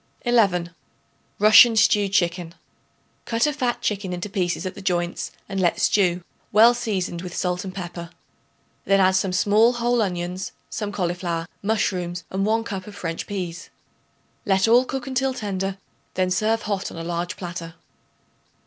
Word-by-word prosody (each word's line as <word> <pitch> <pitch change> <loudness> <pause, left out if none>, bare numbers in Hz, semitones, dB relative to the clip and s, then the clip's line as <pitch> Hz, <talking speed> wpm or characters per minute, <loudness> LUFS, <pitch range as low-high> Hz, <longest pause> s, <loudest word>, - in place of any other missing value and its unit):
11. 190 -8 +2 0.6
Russian 215 +2 +7
Stewed 205 -2 +3
Chicken. 175 -3 0 0.7
Cut 230 +2 +1
a 300 - +1
fat 250 -5 -2
chicken 195 -3 -2
into 180 +3 -5
pieces 180 -3 -1
at 185 - -3
the 200 - -10
joints 175 -2 -1 0.2
and 195 -1 -3
let 175 -2 +1
stew, 180 -3 +2 0.3
well 225 +3 +7
seasoned 190 -7 -3
with 180 -1 -7
salt 180 -1 -1
and 190 - -6
pepper. 175 -2 -6 0.8
Then 195 0 +3
add 190 -1 +5
some 190 0 +1
small 210 +6 +4
whole 240 0 +1
onions, 180 -1 -3 0.2
some 210 -2 -3
cauliflower, 175 -3 -2 0.2
mushrooms 180 -4 -1
and 195 +2 -1
1 225 +1 +1
cup 195 -4 -6
of 205 - -10
French 165 -4 -4
peas. 180 -4 -5 0.7
Let 195 +1 +2
all 240 +3 +5
cook 265 -1 -4
until 265 0 -1
tender; 195 -3 -3 0.4
then 185 0 +1
serve 220 +4 +1
hot 200 -3 -2
on - - -10
a 165 - -5
large 175 +1 -3
platter. 170 -2 -7
190 Hz, 160 wpm, -23 LUFS, 175-215 Hz, 0.8 s, Russian